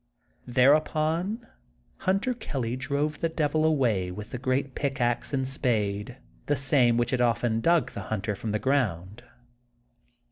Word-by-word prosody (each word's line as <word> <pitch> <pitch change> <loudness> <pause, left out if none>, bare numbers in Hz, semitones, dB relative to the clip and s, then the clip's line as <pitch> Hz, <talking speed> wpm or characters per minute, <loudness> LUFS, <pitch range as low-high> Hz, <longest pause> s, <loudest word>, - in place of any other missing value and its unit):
Thereupon 155 - +2 0.5
Hunter 195 +6 0
Kelly 130 - -3
drove 140 +3 -2
the 165 - 0
Devil 155 -1 0
away 120 -12 +2
with 105 +4 -8
the 125 - -4
great 130 +1 -1
pickaxe 120 -4 -1
and 135 -2 -1
spade, 110 -3 -1 0.3
the 145 - +2
same 135 -3 +3
which 120 +2 +1
had 130 -2 +1
often 115 -1 +1
dug 170 +5 +2
the - - -6
hunter 105 -1 -2
from 105 +2 -4
the, 105 - +1
ground. 110 -6 -1
130 Hz, 140 wpm, -27 LUFS, 115-150 Hz, 0.5 s, same